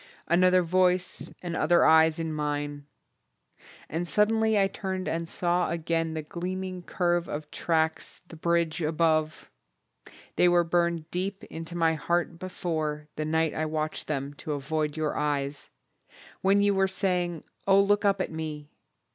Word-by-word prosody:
Another 180 +1 +4
voice 180 +1 +1
and 170 -2 -3
other 170 +2 +4
eyes 160 0 +6
in 160 -1 -3
mine! 145 -1 -3 1.0
And 170 +3 -3
suddenly 220 +2 +3
I 195 - +4
turned 190 -1 -4
and 165 0 -2
saw 175 0 0
again 165 -1 -1
The 155 - -3
gleaming 185 +3 -4
curve 175 -1 0
of 150 0 -6
tracks, 160 -1 -1
the 165 - -11
bridge 170 0 0
above 155 0 0 0.9
They 180 - +5
were 175 0 +4
burned 170 -1 0
deep 195 +3 -3
into 165 +1 -7
my 165 -1 +3
heart 170 +2 -1
before, 155 -5 -3
The 155 - -2
night 160 0 +1
I 155 0 -1
watched 155 0 -3
them 140 -1 -3
to 155 - -3
avoid 150 +2 -2
your 155 -1 -1
eyes, 145 -1 -2 0.7
When 200 +1 +4
you 205 0 +3
were 195 0 +3
saying, 180 -4 -1 0.2
"Oh, 195 0 +6
look 205 +1 +3
up 200 -1 +3
at - - -3
me!" 155 -2 -6
165 Hz, 150 wpm, -27 LUFS, 155-180 Hz, 1.0 s, eyes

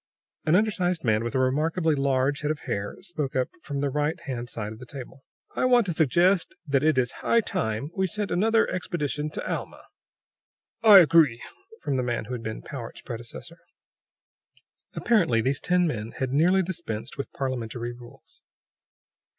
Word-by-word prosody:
An 155 - +5
undersized 185 -4 +1
man 110 -2 +2
with 120 +3 -4
a - - +3
remarkably 155 +5 +1
large 135 0 +1
head 150 - -1
of 155 -1 -2
hair 100 0 -3
spoke 155 -7 -4
up 130 -1 +1
from 145 -3 -5
the 140 -1 0
righthand 140 -4 -2
side 110 -1 -5
of 110 - -13
the 125 - -9
table: 135 0 -9 0.3
"I - - +1
want 245 -3 +5
to 175 - -1
suggest 170 +5 +2
that 140 -2 +1
it 155 -3 +3
is 125 -1 +2
high 230 - +3
time 140 - -2
we 190 0 +1
sent 210 +2 -3
another 225 +4 +3
expedition 150 -5 -2
to - - -6
Alma." - - -5 1.0
"I 215 -3 +9
agree," 155 -7 +4 0.4
from 135 - 0
the 130 - 0
man 120 -2 -2
who 125 - -6
had 120 - -4
been 110 -1 -6
Powart's 120 -5 -8
predecessor. 120 +8 -9 1.4
Apparently 175 - +2
these 135 +5 +1
ten 180 0 +2
men 115 -8 -3
had 130 -1 -3
nearly 180 +6 +4
dispensed 150 - -5
with 140 - -5
parlimentary 120 -3 -3
rules. 120 0 -15
145 Hz, 165 wpm, -26 LUFS, 120-175 Hz, 1.4 s, I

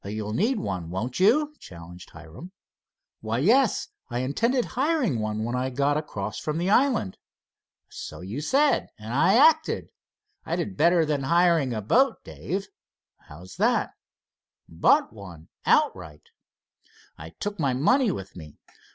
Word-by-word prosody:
"You'll 105 +1 -5
need 220 - +1
one, 90 - -4
won't 110 - -4
you?" 290 +10 +3
challenged 85 +1 -12
Hiram. 85 - -12 0.7
"Why, 110 +1 -3
yes. 230 - +2 0.2
I 120 0 -2
intended 230 - 0
hiring 265 - 0
one 110 0 -3
when 120 +2 -3
I 130 +1 -1
got 140 +3 0
across 105 -9 -4
from 150 0 -3
the 180 +4 0
island." 245 - +1 0.7
"So - - -9
you 105 +10 -6
said, 280 - +2
and 110 +1 -8
I 170 +9 +3
acted. 315 +4 +3 0.5
I 165 - -3
did 180 +2 -4
better 170 +2 +3
than 150 -2 -1
hiring 170 -2 +2
a 110 -3 -4
boat, 260 - +2
Dave." 195 +2 -5 0.6
"How 75 +5 -12
is 95 +1 -13
that?" - - +1 0.8
"Bought 80 +6 +2
one 90 -7 -12 0.2
outright. 75 -2 0 0.9
I 80 +1 -9
took 205 -1 -4
my 135 -5 0
money 245 - +3
with 95 - -7
me. 75 -5 -12
140 Hz, 145 wpm, -25 LUFS, -, 0.9 s, you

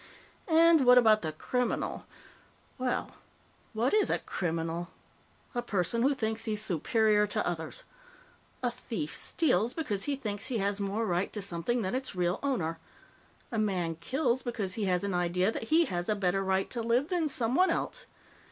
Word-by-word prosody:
And 330 -2 +6
what 250 0 +8
about 220 -3 +6
the 155 - -2
criminal? 250 +10 -2 0.7
Well, 255 -1 -2 0.6
what 230 +4 +1
is 425 -1 +3
a - - +2
criminal? 165 0 -3 0.7
A 240 - -1
person 215 0 0
who 275 +3 +3
thinks 225 -2 -1
he's 215 -1 -1
superior 210 +2 +2
to 205 - -1
others. 175 - -4 0.8
A 245 - +1
thief 220 -10 -5
steals 240 - +1
because 210 -12 -2
he 285 - 0
thinks 210 -6 -4
he 245 - -1
has 200 0 0
more 200 +3 -1
right 180 -1 0
to 210 - -3
something 200 +6 -1
than 185 - -2
its 260 -4 -3
real 180 0 0
owner. 170 - -1 0.7
A 225 - -1
man 185 -6 0
kills 255 - -1
because 220 -6 -3
he 215 0 -2
has 180 -1 +1
an 200 -1 -1
idea 180 +3 +1
that 225 - -5
he 325 +7 +4
has 175 - -3
a 215 - +2
better 195 -1 0
right 190 0 +1
to 235 - -1
live 240 +6 +1
than 340 -4 0
someone 260 +9 +3
else. - - -2
215 Hz, 170 wpm, -30 LUFS, 180-250 Hz, 0.8 s, what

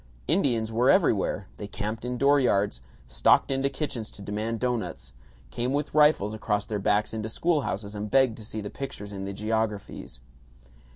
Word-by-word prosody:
Indians 115 -4 +1
were 120 +4 +3
everywhere; 105 - +3
they 105 - -6
camped 105 +3 -4
in 125 0 -3
dooryards, 120 - +3 0.2
stalked - - +3
into 135 +1 +1
kitchens 125 -8 -4
to 100 - -12
demand 110 +3 -3
doughnuts, 125 -2 -3 0.4
came 125 - -1
with 145 +1 -1
rifles 150 -9 +4
across 105 -1 -1
their 105 -2 -3
backs 105 +2 +1
into 110 0 -3
schoolhouses 115 - -1
and 105 0 -4
begged 130 -2 +3
to 110 - -9
see 110 +1 -5
the 100 - -6
pictures 105 -7 -7
in 95 -1 -5
the 100 - -4
geographies. 105 - -3
110 Hz, 165 wpm, -27 LUFS, 105-125 Hz, 0.4 s, rifles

